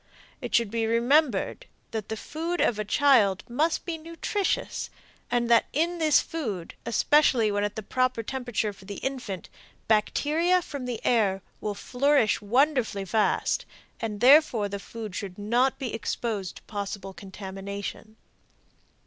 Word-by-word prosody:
It - - -2
should 230 -3 +2
be 225 -1 0
remembered 245 - +2 0.2
that 220 -3 -4
the 220 - -3
food 330 +8 -4
of 220 -3 +2
a - - 0
child 210 -5 +4
must 305 +7 0
be 330 -2 -4
nutritious, 360 +8 -2 0.4
and 240 -1 +1
that 230 - +5
in 335 +4 0
this 310 -2 +5
food, 215 - -5
especially 235 -2 +3
when 205 0 0
at 205 0 -2
the 220 - -5
proper 255 +1 0
temperature 245 -4 -2
for 190 -1 -16
the 200 +1 -6
infant, 245 -9 -4 0.4
bacteria 315 +11 +2
from 285 -5 -6
the 245 -2 -5
air 200 -5 +2 0.2
will 210 -1 -3
flourish 250 +1 +2
wonderfully 235 -3 +1
fast, 210 +3 +1 0.3
and 215 -2 -4
therefore 255 -5 +6
the 200 0 -5
food 220 -1 -8
should 195 -3 -5
not 240 +6 +1
be 255 -4 -4
exposed 220 -4 -3
to - - -13
possible 200 -2 -5
contamination. 200 +2 -7
230 Hz, 145 wpm, -27 LUFS, 205-280 Hz, 0.4 s, therefore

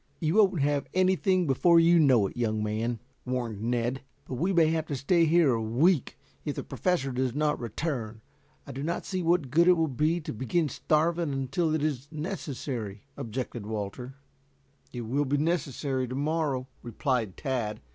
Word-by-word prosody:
"You 160 0 0
won't 195 -7 +4
have 145 0 0
anything 185 0 +3
before 165 +5 +4
you 170 +1 +5
know 130 -9 +5
it, - - -5
young 110 -3 -1
man," 110 +2 -2 0.2
warned 120 -5 -3
Ned. 120 +2 0
"Yes, - - -19 0.2
but - - -7
we 170 +10 0
may 170 -3 +5
have 160 -1 -1
to 145 - -2
stay 165 +6 +3
here 160 -4 +4
a 115 - -1
week, 130 +8 +2 0.3
if - - -3
the - - -4
Professor 175 -8 -1
does 130 0 -1
not 150 0 +1
return. 115 -2 -4 0.4
I - - -8
do 135 - -6
not 170 +4 -2
see 185 -1 -2
what 170 -6 +1
good 170 +4 +4
it 180 -1 +6
will 160 -1 +2
be 155 +5 +1
to 155 - -6
begin 145 +8 0
starving 165 +4 +1
us 140 - -2
until 135 +5 0
it 155 - -1
is 145 -3 -2
necessary," 135 - -5
objected 115 -2 -5
Walter. 110 +5 -5 0.8
"It 120 - -5
will 135 +6 0
be 140 +2 +1
necessary 140 -4 -1
to 130 - -5
morrow," 145 -3 -1
replied 120 -4 -2
Tad. 120 -6 -2
140 Hz, 185 wpm, -28 LUFS, 120-165 Hz, 0.8 s, it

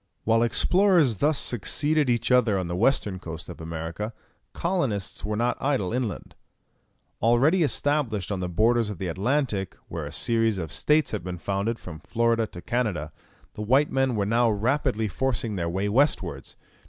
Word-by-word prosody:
While 115 +1 +3
explorers 165 - +3
thus 150 +3 +2
succeeded 145 +5 +2
each 120 +1 0
other 125 -5 +4
on 95 - -2
the 85 - -3
western 105 -3 +1
coast 80 -1 -8
of 90 - -9
America, 80 +7 -5 0.4
colonists 140 - -2
were 105 0 -2
not 120 +3 -1
idle 130 -9 0
inland. 125 -4 -3 0.9
Already 130 - +3
established 140 - 0
on 100 - -2
the 90 -1 -3
borders 110 +5 +2
of 105 - -5
the 95 - -4
Atlantic, 105 - -1
where - - -5
a - - -8
series 115 -3 +1
of 80 -5 -5
states 150 +1 +2
had 105 -4 -3
been 90 0 -5
founded 100 +5 -2
from 80 -7 -9
Florida 115 +4 0
to 90 -3 -11
Canada, 90 -8 -2 0.4
the - - -7
white 130 +7 +2
men 135 -2 +1
were 100 -2 0
now 115 +3 +3
rapidly 110 +1 0
forcing 115 -1 -1
their 85 -3 -2
way 95 +4 -1
westwards. 100 - 0
115 Hz, 165 wpm, -25 LUFS, 95-130 Hz, 0.9 s, other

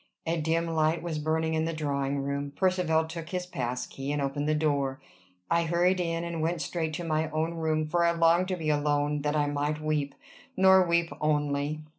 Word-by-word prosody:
A 165 0 0
dim 165 +2 +1
light 160 0 +1
was 165 -3 -3
burning 160 +1 0
in 160 0 +1
the 165 - -2
drawing 140 -2 -1
room. 140 0 -3
Percivale 180 -4 +2
took 165 0 -7
his 180 -1 -3
pass 125 -7 -3
key, 135 +1 -5
and 145 - -1
opened 145 +2 -1
the 155 - +2
door. 140 -3 0 0.5
I 170 0 +3
hurried 175 +3 +2
in, 165 -1 -1
and 170 -1 -3
went 165 +2 -1
straight 160 -3 -2
to 175 - -4
my 155 -1 0
own 160 +2 -1
room; 155 -2 0
for 170 +2 +1
I 170 - +4
longed 170 +2 +3
to 185 - -1
be 160 -3 -1
alone 145 0 +1
that 150 +1 -1
I 150 -1 +2
might 145 +1 -1
weep 150 -2 -1 0.4
nor 190 0 +7
weep 170 -2 +1
only. 150 0 0
155 Hz, 205 wpm, -28 LUFS, 145-170 Hz, 0.5 s, nor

